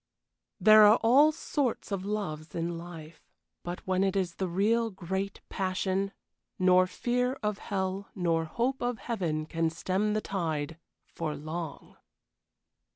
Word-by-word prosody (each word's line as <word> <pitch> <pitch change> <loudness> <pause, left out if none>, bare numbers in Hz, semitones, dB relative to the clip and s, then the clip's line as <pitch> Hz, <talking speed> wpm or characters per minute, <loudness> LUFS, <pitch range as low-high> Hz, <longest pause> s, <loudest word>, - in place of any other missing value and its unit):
There 215 0 +8
are 210 +2 +7
all 275 +7 +6
sorts 280 -7 -2
of 195 -2 -2
loves 180 -7 -4
in 170 +1 -2
life, 165 -2 -10 0.3
but 175 +1 -6
when 185 0 +1
it 195 0 +1
is 185 -3 0
the 190 - -1
real 220 +6 +2
great 190 0 -4
passion, 190 +1 -1 0.5
nor 185 0 +5
fear 250 +5 0
of 210 -1 -1
hell 190 0 -3
nor 165 -3 +1
hope 245 +10 -1
of 245 -1 -1
heaven 175 -9 -2
can 165 +1 0
stem 190 +6 -1
the - - +2
tide 160 -5 -3 0.3
for 155 -2 -4
long! 155 +1 -6
190 Hz, 140 wpm, -29 LUFS, 165-210 Hz, 0.5 s, There